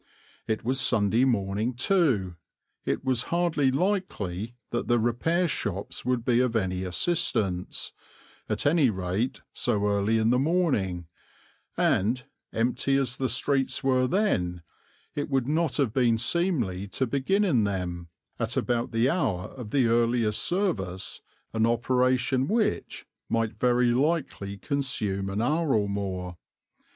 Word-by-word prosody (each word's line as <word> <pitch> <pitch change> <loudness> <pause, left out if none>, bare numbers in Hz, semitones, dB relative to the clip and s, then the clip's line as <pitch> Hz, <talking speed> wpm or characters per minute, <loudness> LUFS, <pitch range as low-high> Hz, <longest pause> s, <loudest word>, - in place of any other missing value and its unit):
It 110 -1 -1
was 130 +2 +1
Sunday 110 +3 +3
morning, 110 0 0
too; 130 - +1 0.5
it - - -2
was 130 -2 +1
hardly 170 -5 +2
likely 130 - -2 0.2
that 120 - -2
the 120 - +3
repair 120 +10 +1
shops 100 - -3
would 125 -1 -1
be 120 -1 +3
of 125 -2 +1
any 95 -3 0
assistance, 95 - -1 0.6
at - - -1
any 145 -3 +4
rate 95 +4 -2
so 105 0 0
early 100 +2 +2
in 110 +1 +2
the 125 - +3
morning, 130 - +1 0.7
and, 120 +6 +2 0.3
empty 125 +4 +1
as 130 -2 -1
the 130 -1 -1
streets 130 +2 0
were 130 -1 +3
then, 90 - 0 0.5
it 145 0 -3
would 135 -3 +1
not 155 0 0
have 135 -7 +1
been 120 -3 +3
seemly 115 - 0
to 130 - +1
begin 140 - +1
in 130 - +3
them, 90 -4 -3 0.3
at - - -1
about 120 0 0
the 115 +2 +2
hour 115 - 0
of 125 -5 -9
the 135 +1 +2
earliest 115 -1 +2
service, 100 - -1 0.3
an 110 0 +2
operation 125 +2 +1
which 220 +3 -1 0.2
might 115 -1 -1
very 125 -1 +3
likely 130 -7 -1
consume 100 -6 -2
an 100 +3 -1
hour 150 +1 +1
or 105 -2 +1
more. 95 -3 -4
120 Hz, 140 wpm, -27 LUFS, 100-135 Hz, 0.7 s, any